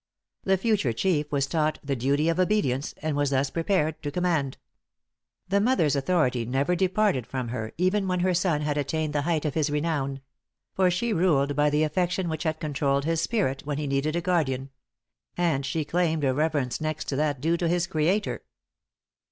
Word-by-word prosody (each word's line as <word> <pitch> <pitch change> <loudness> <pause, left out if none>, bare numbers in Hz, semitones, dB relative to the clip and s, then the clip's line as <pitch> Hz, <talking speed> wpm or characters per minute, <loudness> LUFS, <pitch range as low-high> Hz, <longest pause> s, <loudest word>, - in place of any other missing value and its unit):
The 190 0 +3
future 190 - +1
chief 150 +2 0
was 140 -2 +1
taught 155 +2 0
the 140 -1 -1
duty 140 +5 +1
of 165 +1 +1
obedience, 180 -9 +1
and 155 -2 -1
was 145 -1 +1
thus 135 0 0
prepared 165 -2 0
to 145 - -3
command. 160 -4 0 0.9
The 200 +2 +2
mother's 205 - +2
authority 135 -5 +1
never 135 +8 0
departed 185 - +1
from 125 -2 -4
her, 110 -2 -4
even 190 +3 +1
when 180 -1 0
her 185 0 +2
son 170 -4 +1
had 150 -1 -1
attained 155 +2 -2
the 145 - +1
height 160 0 0
of 150 - -1
his 155 -2 +1
renown; 145 -3 -1 0.5
for 190 -1 +3
she 215 +6 0
ruled 145 -6 +2
by 150 +1 +3
the 150 +1 +2
affection 175 +2 0
which 160 +1 -4
had 155 0 -1
controlled 140 -2 0
his 165 0 +1
spirit 175 - 0
when 145 -1 -3
he 150 - -2
needed 140 +3 0
a 170 - 0
guardian; 140 -7 0 0.7
and 160 -6 +1
she 160 -2 -1
claimed 160 -2 0
a 130 -2 +2
reverence 145 -3 -1
next 155 -1 -2
to 135 - -1
that 145 -2 0
due 165 +5 +1
to 170 - 0
his 175 0 +1
Creator. 175 +7 0
155 Hz, 190 wpm, -26 LUFS, 140-175 Hz, 0.9 s, The